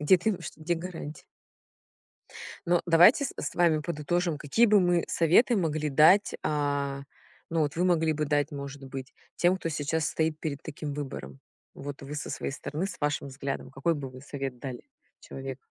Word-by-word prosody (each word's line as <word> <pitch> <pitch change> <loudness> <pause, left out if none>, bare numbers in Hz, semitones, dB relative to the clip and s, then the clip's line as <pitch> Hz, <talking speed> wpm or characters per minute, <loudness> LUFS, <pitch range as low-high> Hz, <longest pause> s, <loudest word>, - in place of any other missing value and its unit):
Где 150 +5 +6
ты 215 +6 +1
в 175 - -12
чт - - -7
где 160 +3 -1
гарантия? 165 -3 -7 1.4
Но 175 0 +3
давайте 175 - +6
с - - -4
с - - -4
вами 170 -3 +4
подытожим: 170 +1 -1
какие 155 +12 +3
бы 210 -2 +5
мы 175 -2 +3
советы 180 +9 +4
могли 155 -5 0
дать? 160 +8 +5
А, 140 -2 -1 0.5
ну 165 -1 +1
вот 145 -1 -1
вы 180 +2 +1
могли 165 -3 +3
бы 150 0 -1
дать, 145 +1 +1
может 140 -1 -7
быть, 135 -1 -7 0.2
тем, 180 +2 +3
кто 165 - -3
сейчас 155 +1 -1
стоит 160 0 -1
перед 145 -4 -4
таким 150 -1 -6
выбором. 100 - -6 0.3
Вот 145 0 -7
вы 140 +2 -6
со 150 - -4
своей - - -3
стороны, 150 +5 -4
с - - -8
вашим 145 -1 -1
взглядом, 135 0 -5
какой 140 +5 0
бы 140 -3 -5
вы 130 0 -12
совет 135 -3 -5
дали 130 -3 -6 0.4
человеку? 135 -1 -7
150 Hz, 185 wpm, -28 LUFS, 140-170 Hz, 1.4 s, Где